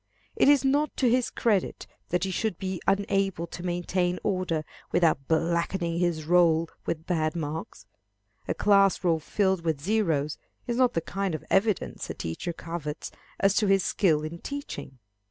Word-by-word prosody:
It - - +4
is 285 -1 +5
not 290 +2 +1
to 260 - +3
his 245 +1 +2
credit 210 -6 0 0.2
that 180 0 0
he 190 - -1
should 215 -1 -1
be 190 -2 -4
unable 195 -3 +1
to 170 - -9
maintain 175 0 -1
order 185 -5 0 0.3
without 160 -6 +2
blackening 170 +1 0
his 170 -3 0
roll 165 -1 +4 0.2
with 160 0 -2
bad 160 -3 0
marks. 160 +4 -5 0.6
A - - -1
class 195 -2 +4
roll 165 -3 +2
filled 190 +3 0
with 160 -4 0
0's 160 -5 0 0.3
is 240 -1 -2
not 250 -1 +3
the 165 - 0
kind 195 +1 -2
of - - -7
evidence 205 0 +1
a - - -4
teacher 85 - -4
covets 165 -2 -6 0.3
as 195 0 +4
to 210 - +3
his 195 -1 +4
skill 155 -6 +2
in 160 +2 -6
teaching. 285 - -7
175 Hz, 165 wpm, -27 LUFS, 165-195 Hz, 0.6 s, is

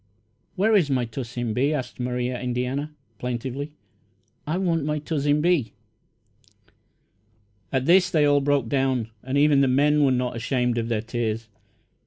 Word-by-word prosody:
"Where 215 +4 +2
is 175 -8 +3
my 130 -3 +1
Tuzzin 120 0 -4
Bee?" 140 +6 +1
asked 130 -4 -5
Maria 125 0 -2
Indiana, 125 +4 -2 0.3
plaintively. 130 +4 -4 0.7
"I 160 +4 0
want 170 -5 0
my 150 +1 -1
Tuzzin 145 -1 0
Bee!" 165 -8 +1 2.0
At 130 -1 0
this 180 +3 +5
they 155 -4 +3
all 145 -1 +4
broke 140 -3 +1
down, 130 -3 0
and 130 +2 -2
even 145 -1 +4
the 135 - +4
men 145 +3 +3
were 135 - +4
not 125 -1 -1
ashamed 125 0 0
of 115 - -2
their 110 -2 -1
tears. 115 -1 -3
135 Hz, 150 wpm, -24 LUFS, 125-150 Hz, 2.0 s, this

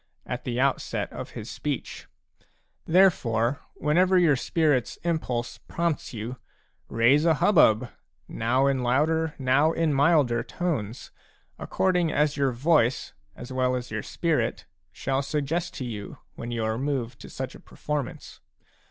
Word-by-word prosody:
at 125 0 -5
the 120 -1 -2
outset 135 0 0
of - - -6
"his - - -6
speech. - - -5 0.8
1 165 - -3
Ifteilefore* 130 - +3 0.2
whenever 180 +5 +3
your 165 -5 +5
spirit's 145 -2 0
inipulse 125 -8 -2
prompts 170 -3 -2
you/raise 120 +3 -1
a 165 -1 +4
hubbub, 125 - +4 0.4
now 125 +4 +1
in 135 -2 +1
louder 155 +6 +1
now 135 +4 +3
in 165 -2 +1
milder 140 -5 +3
tones, 125 - -4 0.5
according 180 -4 +1
as 150 -1 +1
your 140 -2 +1
voice, 130 0 +1 0.2
as 125 +1 -9
well 130 0 +1
as 125 -2 -5
your 110 -1 -2
spirit, 120 - -1 0.3
shall 135 +7 -1
suggest 150 +4 -2
to 130 - -4
you, 105 -4 -6 0.2
when 115 +4 -7
you 115 -2 -2
are 110 +1 -1
moved 135 -4 -2
to - - -10
such - - -5
a - - -12
performance. 150 -4 -5
135 Hz, 140 wpm, -26 LUFS, 120-160 Hz, 0.8 s, your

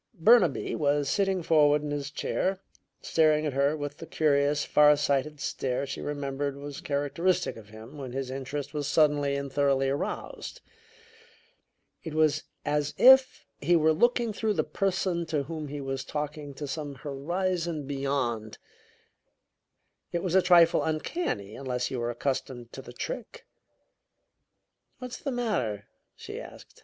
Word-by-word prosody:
Burnaby 180 - +4
was 145 -1 +1
sitting 195 -1 +1
forward 150 -2 +4
in 150 - -4
his 145 -1 -3
chair, 190 +5 -1 0.4
staring 155 -1 +3
at 145 - -1
her 140 +3 +2
with 145 0 -5
the 165 - -9
curious, 145 -1 +2
far 150 0 +5
sighted 145 +1 0
stare 130 -1 -2
she 140 - -6
remembered 140 -1 -3
was 140 0 -7
characteristic 165 +6 0
of 105 -2 -13
him 110 +7 -11
when 130 -3 -6
his 130 0 -4
interest 135 +2 -5
was 145 -2 -2
suddenly 145 -3 +3
and 140 -1 -4
thoroughly 135 -1 +2
aroused. 145 - -4 1.4
It 160 -3 -6
was 155 -1 +2 0.2
as 150 0 0
if 265 0 +6
he 175 +5 +3
were 160 -1 +4
looking 240 +5 +2
through 215 +1 0
the - - +1
person 185 -3 -1
to 150 -3 0
whom 155 +1 -6
he 145 0 -5
was 135 -1 -3
talking 150 -1 -5
to 145 +1 -5
some 145 0 -5
horizon 165 +3 -2
beyond. 135 -6 -2 1.5
It 170 - -2
was 180 -3 -1
a 190 - +6
trifle 175 -2 +5
uncanny, 155 - -2
unless 125 -2 -3
you 130 - -2
were 120 0 -1
accustomed 120 -1 -3
to 135 - -7
the 120 - -11
trick. 230 - -6 1.5
"What's 250 -1 -7
the 280 - -4
matter?" 170 - -1 0.3
she - - -8
asked. - - -13
145 Hz, 150 wpm, -28 LUFS, 135-165 Hz, 1.5 s, if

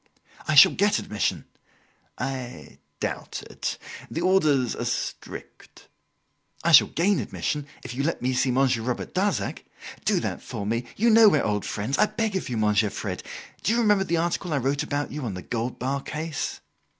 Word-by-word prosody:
"I 155 - +1
shall 145 - +10
get 205 +1 +2
admission." 105 - -2 0.7
"I 130 -2 -6 0.2
doubt - - -4
it. - - -4 0.3
The 165 - -3
orders 155 -9 +3
are - - -4
strict." - - -6 0.7
"I - - +3
shall - - +9
gain 190 +4 +1
admission, 150 -2 -3 0.2
if 125 - -6
you 130 - -2
let 165 +4 -1
me 130 +1 0
see 125 +1 +2
Monsieur 130 -2 +2
Robert 125 +1 -3
Darzac. 195 +2 -1 0.4
Do - - +2
that - - -3
for 100 - -6
me. 115 +3 -1
You 230 +3 +3
know 220 -1 +8
we 155 - +3
are - - 0
old 105 -1 -1
friends. 110 +7 -2
I - - +5
beg 215 -1 -2
of 190 - -2
you, 120 - -2
Monsieur 105 0 +2
Fred. - - -5 0.4
Do 220 - +1
you - - +2
remember 210 -4 +4
the 170 -3 0
article 170 +1 -1
I - - +2
wrote 140 +2 0
about 145 0 -2
you 150 -1 -5
on 105 -6 -3
the 90 - -7
gold 120 +1 -3
bar 135 +2 -2
case?" 155 0 -4
140 Hz, 185 wpm, -25 LUFS, 125-185 Hz, 0.7 s, shall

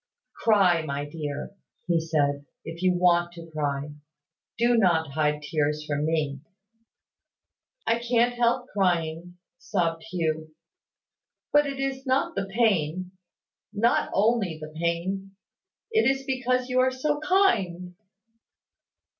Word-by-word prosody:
"Cry, 195 -7 +4
my 145 -1 -4
dear," 145 -2 -5 0.3
he 170 -2 +2
said, 145 -3 0 0.2
"if 165 +1 -7
you 185 -1 +3
want 175 -1 +3
to 165 -1 -11
cry. 145 -1 -2 0.6
Do 240 +1 +3
not 170 -8 +2
hide 150 0 0
tears 150 0 -1
from 150 0 -1
me." 150 -4 -1 1.5
"I 230 - +2
can't 240 0 +2
help 245 +1 +1
crying," 175 -2 -1 0.2
sobbed 165 -5 -1
Hugh: 160 -2 -2 1.0
"but 295 0 +5
it 275 -1 -5
is 270 0 -3
not 260 +1 +1
the 195 0 -2
pain, 185 -5 +1 0.6
not 225 +3 +2
only 205 -5 +1
the 155 0 -9
pain; 180 +4 -2 0.6
it 445 -9 +4
is 270 0 -1
because 255 -1 0
you 255 0 +1
are 255 0 +4
so 290 +3 -1
kind!" 200 - +1
180 Hz, 120 wpm, -26 LUFS, 160-235 Hz, 1.5 s, but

